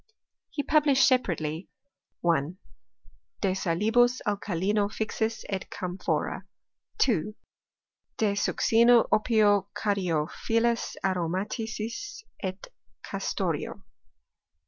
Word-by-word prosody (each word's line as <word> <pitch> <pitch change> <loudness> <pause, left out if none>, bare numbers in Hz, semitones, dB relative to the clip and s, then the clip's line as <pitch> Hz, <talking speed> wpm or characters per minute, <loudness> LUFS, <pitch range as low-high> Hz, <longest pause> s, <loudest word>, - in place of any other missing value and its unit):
He 285 - -3
published 290 -3 +4
separately, 170 - 0 0.5
1. 170 0 +1 0.8
De 190 -2 +2
salibus 220 +8 +2
alkalino 205 0 0
fixis 220 +1 -2
et 195 -2 -4
camphora. 180 0 -3 0.5
2. 215 - +1 0.8
De 215 -2 +2
succino, 230 +3 +4
opio, 210 -3 +3
caryophyllis 205 +5 0
aromaticis 215 - -3 0.2
et 190 -1 -4 0.4
castoreo. - - -3
210 Hz, 75 wpm, -27 LUFS, 185-230 Hz, 0.8 s, published